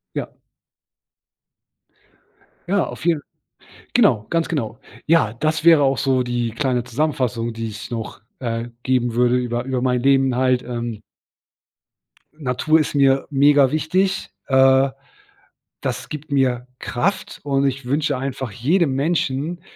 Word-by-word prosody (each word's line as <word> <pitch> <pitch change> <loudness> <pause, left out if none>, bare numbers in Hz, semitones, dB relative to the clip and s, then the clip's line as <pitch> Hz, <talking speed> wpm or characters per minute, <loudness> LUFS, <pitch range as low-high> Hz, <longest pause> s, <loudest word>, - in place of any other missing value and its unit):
Ja. - - -3 2.4
Ja, 195 -1 +2
auf - - -8
jeden 165 -3 +2 0.7
genau. 105 0 +3
Ganz 165 -1 0
genau. 125 -6 -3 0.3
Ja, 160 -9 +3
das 155 +6 -1
wäre 165 -3 +7
auch 135 -1 +1
so 135 -2 +2
die 120 -1 -1
kleine 125 +1 -1
Zusammenfassung, 125 -2 -1
die 115 0 -5
ich 105 +1 -8
noch, 115 -1 -6 0.2
äh, 115 -1 -3
geben 125 -2 0
würde 125 +1 +3
über 120 -1 -2
über 130 -1 -2
mein 125 -1 +1
Leben 135 -1 +3
halt, 130 0 +2
ähm. 120 -3 -5 1.3
Natur 155 +2 +1
ist 150 - -2
mir 135 -1 +3
mega 140 -1 +5
wichtig, 185 +6 0 0.2
äh, 135 0 +4 0.9
das - - -4
gibt 150 0 -8
mir 125 -3 +1
Kraft. 190 +11 -2
Und 140 -1 +1
ich 135 0 -2
wünsche 145 +2 0
einfach 130 -1 -4
jedem 145 - +1
Menschen, 155 +2 -1
135 Hz, 130 wpm, -21 LUFS, 120-150 Hz, 2.4 s, wäre